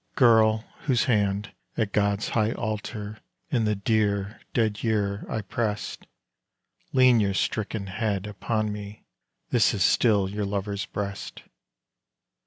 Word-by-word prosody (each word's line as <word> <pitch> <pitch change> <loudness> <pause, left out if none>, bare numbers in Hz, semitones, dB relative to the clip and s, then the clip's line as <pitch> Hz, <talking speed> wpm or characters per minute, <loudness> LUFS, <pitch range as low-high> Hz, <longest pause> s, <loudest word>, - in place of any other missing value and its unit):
Girl, 110 -3 +5 0.2
whose 130 -6 +3
hand 100 -3 +1 0.3
at 110 -3 0
God's 100 0 +1
high 110 0 +1
altar 105 0 -4 0.3
in 120 -4 +2
the 105 0 +1
dear, 100 0 0
dead 110 -3 0
year 105 -3 0
I 110 - -2
pressed, 105 +1 -3 0.8
Lean 130 -2 +6
your 100 -2 +1
stricken 105 -1 -1
head 100 0 -2
upon 105 +1 -2
me 105 0 -9 0.5
this - - +4
is - - +3
still 105 -5 +3
your 105 +2 -3
lover's 100 -1 -3
breast! 100 -1 -5
105 Hz, 125 wpm, -26 LUFS, 100-110 Hz, 0.8 s, Lean